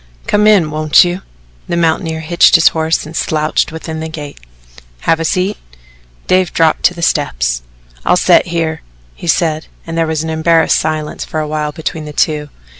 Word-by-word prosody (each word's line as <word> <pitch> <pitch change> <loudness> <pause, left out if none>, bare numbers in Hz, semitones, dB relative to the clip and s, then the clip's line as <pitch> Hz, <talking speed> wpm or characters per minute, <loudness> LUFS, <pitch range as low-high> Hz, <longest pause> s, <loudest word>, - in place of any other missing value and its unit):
"Come 210 +1 +2
in 190 -8 +4
won't 155 0 +4
you?" 175 +1 -3 0.5
The 170 - -2
mountaineer 160 -1 0
hitched 170 +3 +4
his 165 -2 +6
horse 160 0 -1
and 155 +2 -10
slouched 155 0 0
within 160 0 -6
the 160 0 -5
gate. 150 -3 -8 0.6
"Have 165 - +1
a - - -1
seat." 185 +5 0 0.7
Dave 185 -2 +2
dropped 160 -1 +2
to 180 - +3
the 170 - -6
steps. - - 0 0.4
"I'll - - +3
set - - +4
here," 165 -2 -2 0.3
he - - -9
said, 160 -2 0 0.2
and 165 - -6
there 165 -1 +1
was 160 -1 -1
an 160 - -3
embarrassed 160 +1 +3
silence 155 -1 -3
for 155 - -4
a 155 - -2
while 150 0 -2
between 160 +1 -5
the 150 - -8
two. 150 0 0
160 Hz, 185 wpm, -14 LUFS, 155-170 Hz, 0.7 s, his